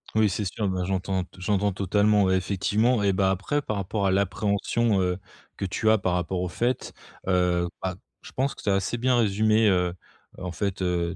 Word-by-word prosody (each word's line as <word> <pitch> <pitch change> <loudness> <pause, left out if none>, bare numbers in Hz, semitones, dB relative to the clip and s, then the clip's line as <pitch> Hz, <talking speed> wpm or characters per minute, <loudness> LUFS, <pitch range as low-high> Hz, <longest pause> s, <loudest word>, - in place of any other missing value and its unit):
Oui, 110 -1 +4
c'est 105 +3 -2
sûr 100 +2 -2
ben 95 -1 -1
j'entends 95 0 -1
t - - -16
j'entends 100 +1 +1
totalement, 100 +2 +2
ouais, 95 0 +3
effectivement 105 +5 +1
et 100 -1 +2
bah, 95 0 +2
après, 100 +11 -1
par 110 -6 -3
rapport 100 +1 -2
à 95 - +3
l'appréhension, 100 +3 +1
heu, 90 -1 0 0.4
que - - -6
tu 105 +3 0
as 110 - +5
par 95 -3 -1
rapport 90 +1 -1
au 90 - -2
fait, 120 +7 -1 0.4
heu, 90 -1 +2
bah, 95 -1 -2 0.3
je - - -12
pense 135 +1 0
que - - -13
tu - - -1
as - - +4
assez 95 +5 -1
bien 125 +1 +2
résumé, 110 0 +3
heu 90 -2 +1 0.4
heu, - - -9
en 90 - -3
fait, 95 +2 -3
heu, 90 -1 0
95 Hz, 215 wpm, -26 LUFS, 90-105 Hz, 0.4 s, as